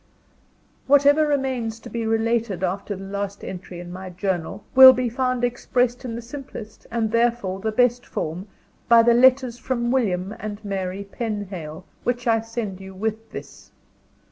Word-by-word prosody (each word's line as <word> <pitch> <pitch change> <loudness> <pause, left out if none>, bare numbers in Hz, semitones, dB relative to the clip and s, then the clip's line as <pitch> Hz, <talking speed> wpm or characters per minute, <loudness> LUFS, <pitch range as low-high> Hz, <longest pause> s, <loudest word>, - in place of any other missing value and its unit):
Whatever 285 +2 +5
remains 260 -6 -1
to - - -11
be 230 -1 -3
related 225 -4 0
after 195 +3 -2
the 190 - -9
last 200 0 -4
entry 180 -1 -7
in 175 0 -8
my 185 0 -7
journal, 190 +1 -3
will 260 0 +11
be 250 -1 -1
found 255 +1 -1
expressed 245 0 0
in 235 -3 -5
the 235 - -6
simplest, 245 -4 -9
and 225 -2 -1
therefore, 230 -5 +1
the 220 +2 -2
best 245 +2 +2
form, 175 +1 -4 0.4
by 230 -1 +8
the 235 0 +5
letters 255 0 +4
from 240 -1 -1
William 200 -6 0
and 210 0 -6
Mary 195 -1 -3
Penhale, 190 -8 -5 0.2
which 245 0 -1
I 225 -2 +3
send 225 -4 -5
you 190 0 -10
with 220 +3 -3
this. - - -10
225 Hz, 160 wpm, -23 LUFS, 195-245 Hz, 0.4 s, will